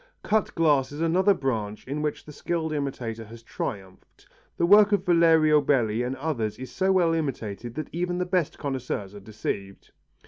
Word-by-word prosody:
Cut 215 -1 0
glass 145 -5 +2
is 145 - -7
another 185 +5 +3
branch 110 - -3
in 145 +3 -3
which 150 -1 -3
the 150 - -11
skilful 160 +1 -2
imitator 125 -6 -4
has 115 +2 -13
triumphed. 95 -4 -7 0.3
The 170 - +2
work 205 +3 +7
of 205 - +1
Valerio 160 -3 +5
Belli 120 -6 +1
and 125 +2 -2
others 130 -7 -3
is 130 -1 -8
so 190 +8 +1
well 175 -3 +3
imitated 120 -7 -4
that 155 - -5
even 175 +1 -2
the 180 - -1
best 180 -4 -1
connoisseurs 130 -8 -4
are 105 - -9
deceived. 100 -1 -6
145 Hz, 175 wpm, -26 LUFS, 115-170 Hz, 0.3 s, work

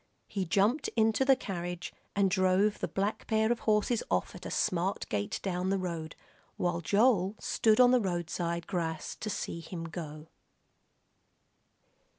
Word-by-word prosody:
He 195 -2 -2
jumped 205 - +2
into 225 +2 +3
the 270 0 +5
carriage 175 -6 -5 0.2
and 195 -2 +3
drove 190 +2 +3
the - - -1
black 200 +2 -2
pair 220 0 +2
of 240 - 0
horses 215 +2 +2
off - - 0
at - - -8
a - - -5
smart 185 +2 0
gait 100 -1 -2
down 185 -1 -1
the 195 - +2
road, 170 -4 -4 0.4
while 175 -1 0
Joel 205 0 +3
stood 220 0 +2
on 250 -1 +7
the 250 -1 +4
roadside 170 -2 -2
grass 165 -4 -3
to 215 - -4
see 170 - -3
him 165 0 -7
go. 155 -2 -7
190 Hz, 155 wpm, -30 LUFS, 170-215 Hz, 0.4 s, on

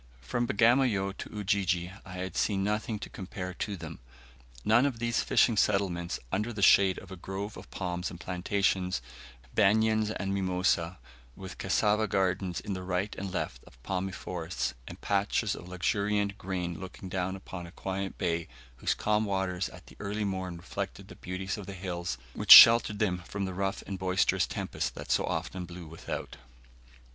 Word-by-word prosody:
From 120 - -1
Bagamoyo 110 -4 +3
to - - -7
Ujiji 95 -4 0
I 95 - -10
had 90 +1 -5
seen 100 -2 +1
nothing 105 +2 -1
to - - -7
compare 95 -1 -6
to 100 +2 -4
them 80 -1 -8 0.7
none 120 +6 +5
of 130 -4 -3
these 115 +1 0
fishing 115 - +3
settlements 90 -4 +1
under 105 +5 -1
the 105 -3 -3
shade 95 -1 +6
of 95 - -10
a - - -5
grove 95 +3 -5
of - - -11
palms 90 -2 -3
and 85 - -10
plantains, 90 -3 0 0.5
banians 110 +1 +3
and 95 0 -1
mimosa, 90 -2 +1 0.4
with 95 -1 -9
cassava 105 +3 +2
gardens 95 -2 0
to 100 - -3
the 95 - -4
right 95 +2 -2
and 95 -1 -5
left - - -4
of - - -18
palmy 95 +2 -2
forests, 90 -7 -3
and - - -9
patches 100 +2 +1
of 85 - -8
luxuriant 100 +2 0
grain 90 -3 -3
looking 95 0 -8
down 95 0 -2
upon 95 -2 -8
a - - -12
quiet 95 +1 -4
bay, 85 -1 -1 0.3
whose - - 0
calm 105 0 +1
waters 95 -2 -1
at - - -13
the - - -16
early 105 +2 -2
morn 95 -3 -3
reflected 85 - -6
the - - -10
beauties 95 +3 -4
of 100 - -8
the 100 - -6
hills 90 -6 -4 0.2
which - - -6
sheltered 115 -2 +11
them 95 -4 +1
from 100 +3 -4
the 95 - -4
rough 95 +1 -2
and 95 -2 -5
boisterous 95 0 +2
tempests - - -3
that - - -7
so - - +3
often 90 -1 -3
blew 85 0 -9
without. 80 +1 -6
95 Hz, 175 wpm, -30 LUFS, 90-100 Hz, 0.7 s, sheltered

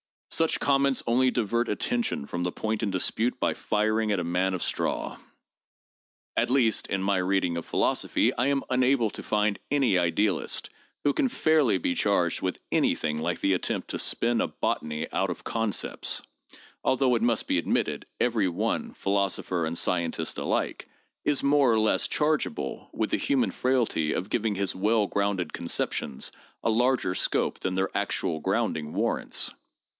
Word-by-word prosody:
Such 165 0 +2
comments 140 -1 +2
only 125 +2 +3
divert 120 0 0
attention 240 - -1
from 85 +4 -4
the 90 0 -1
point 110 +2 -2
in 110 - 0
dispute 110 +6 0
by - - +1
firing 110 +1 0
at 100 - +1
a - - -1
man 90 +2 0
of 90 - -3
straw. - - -1 1.2
At - - +1
least, 125 -4 +2
in 95 -1 -1
my 100 0 +2
reading 90 -2 +1
of 85 - -5
philosophy, - - +1
I 125 +3 0
am 140 -1 +1
unable 125 -3 +2
to - - -7
find 105 -1 0
any 130 -10 +3
idealist 90 +2 0 0.3
who 145 - +3
can 260 - +1
fairly 155 - +3
be 90 - -1
charged 90 -4 +1
with 95 -1 -2
anything 75 -1 +1
like 85 +1 -2
the 95 - +3
attempt 90 - -2
to - - -3
spin 120 0 +2
a - - +1
botany 75 0 -2
out - - 0
of - - -5
concepts, 115 -3 -1 0.6
although 130 -1 +2
it 115 - +1
must 115 -1 +1
be 90 - +1
admitted, - - -1
every 115 -5 +2
one, 85 - -2
philosopher 95 -4 0
and 85 +1 -3
scientist 85 -3 0
alike, - - -2 0.4
is 145 -1 +1
more 140 -3 +4
or 110 - +3
less 110 - +2
chargeable 155 +8 -1
with - - -2
the - - +2
human 265 -3 +1
frailty 120 -12 0
of 95 - -4
giving 110 -2 0
his 100 0 0
well 105 +3 +2
grounded 100 -4 -1
conceptions 85 -5 -1 0.3
a 115 - +2
larger 120 -4 +2
scope - - 0
than 95 0 -2
their 95 +1 -1
actual 80 - -1
grounding 75 0 -1
warrants. - - 0
105 Hz, 165 wpm, -27 LUFS, 90-125 Hz, 1.2 s, more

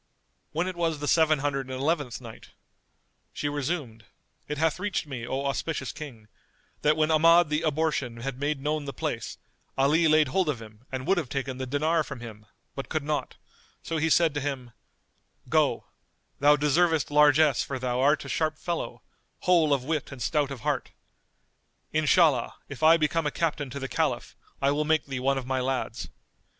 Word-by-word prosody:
When 170 +4 -1
it 185 - -4
was 165 -2 0
the 145 0 -4
Seven 155 -1 +4
Hundred 135 -2 -1
and 130 0 -4
Eleventh 145 -5 -1
Night, 115 -3 -12 0.8
She 145 - -3
resumed, 145 - -3 0.4
It 150 - -3
hath 160 +3 +1
reached 205 -3 -2
me, 125 -5 -6
O 135 +2 -2
auspicious 140 +4 -2
King, 135 -8 -10 0.5
that 150 +1 +3
when 155 0 +2
Ahmad 165 +1 +5
the 150 +1 0
Abortion 150 -7 -1
had 130 0 -4
made 145 0 -1
known 150 0 -1
the 140 - -5
place, - - -4 0.4
Ali 150 +5 +4
laid 155 -2 +4
hold 185 +3 +1
of 135 -6 -1
him 110 +2 -14
and 130 -1 -4
would 195 -2 +3
have 145 -7 -5
taken 135 -1 -3
the 130 - -3
dinar 155 +4 +1
from 130 - -8
him, 110 -3 -10 0.3
but 135 - -6
could 155 -2 -1
not; 150 0 -2 0.5
so 165 - -2
he 160 +1 +1
said 165 -1 +4
to 145 - -2
him, 130 -4 -4 0.8
"Go: - - +2 0.5
thou 145 +1 +6
deservest 150 +1 +2
largesse 150 -1 +5
for 140 - -3
thou 125 -1 -2
art 145 +3 +3
a - - -7
sharp 155 -1 -1
fellow, 170 0 -4 0.4
whole 170 -4 +3
of 140 -3 +2
wit 155 +1 -2
and 135 - -9
stout 150 -3 +1
of 135 -4 -7
heart. - - -2 1.0
Inshallah, 155 -4 +3
if 140 -1 -9
I 160 +1 +7
become 155 0 0
a - - +2
captain 150 -3 -2
to 140 +3 -6
the 135 - -4
Caliph, - - -1 0.3
I 140 - +4
will 150 +1 +1
make 155 -1 +1
thee 135 -2 -4
one 135 +2 +1
of 130 - -4
my 130 0 -1
lads." 130 0 -3
145 Hz, 185 wpm, -27 LUFS, 130-155 Hz, 1.0 s, I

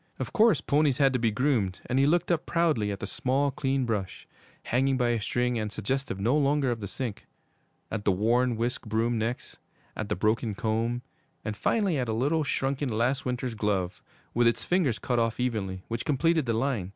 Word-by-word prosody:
Of - - -5
course 230 -1 +4
ponies 145 -2 +2
had 135 -2 +4
to 125 - +1
be 115 -1 +2
groomed, 110 -6 0
and 130 +2 0
he 140 - +4
looked 175 +3 +2
up 170 -2 0
proudly 155 -12 +1
at 100 - -5
the - - -2
small, 140 +2 0
clean 135 -1 0
brush, 100 -5 -3 0.4
hanging 135 +2 +1
by 120 -2 +2
a 115 -2 0
string 125 +2 0
and 105 -1 -3
suggestive 135 0 -2
no 115 +8 +2
longer 140 -2 +2
of 115 - -3
the 100 - -5
sink; 115 0 -5 0.6
at 110 -2 -3
the 100 - +3
worn 120 +6 +2
whisk 120 0 -2
broom 115 +2 0
next; 115 +3 -4 0.4
at 105 - -4
the - - 0
broken 110 +2 0
comb; 115 +3 -1 0.4
and 110 - -2
finally 190 - +1
at 125 -2 -1
a - - 0
little, 145 +8 +1
shrunken 135 0 -1
last 120 +4 0
winter's 125 -1 -2
glove, 100 -4 -1 0.3
with 120 0 +3
its 115 - +1
fingers 170 - +2
cut 120 -2 -1
off 115 0 0
evenly, 100 -7 -2
which 115 0 -3
completed 160 0 +1
the 115 - +1
line. 115 -6 -1
120 Hz, 200 wpm, -28 LUFS, 110-135 Hz, 0.6 s, course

